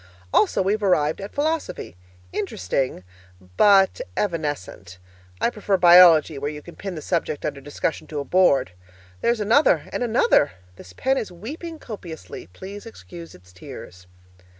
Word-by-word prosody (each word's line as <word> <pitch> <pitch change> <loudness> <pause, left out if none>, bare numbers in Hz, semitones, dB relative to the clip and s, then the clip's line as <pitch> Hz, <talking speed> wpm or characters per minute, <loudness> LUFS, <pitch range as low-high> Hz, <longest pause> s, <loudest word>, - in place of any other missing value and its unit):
Also 210 -2 +3
we've 205 +3 0
arrived 160 -4 +1
at 195 - -7
philosophy 310 - -3 0.4
interesting 130 - -2 0.5
but 200 - +4 0.2
evanescent. 145 - -3 0.4
I - - +1
prefer 205 -3 0
biology 170 -4 +7
where 145 +1 -2
you 150 -1 -8
can 175 - -12
pin 195 -2 -6
the 155 - -7
subject 165 -4 -2
under 140 - -4
discussion 150 +2 -4
to 150 - -5
a 140 - -4
board. 140 - +3 0.5
There's 235 -1 +1
another! 225 +9 +3
And - - -3
another! 230 - +3 0.2
This 90 0 -14
pen 265 - 0
is 210 - -6
weeping 300 - -8
copiously. 165 - -9
Please 195 - -10
excuse 175 -6 -11
its 90 0 -19
tears. 90 0 -11
175 Hz, 145 wpm, -23 LUFS, 145-210 Hz, 0.5 s, biology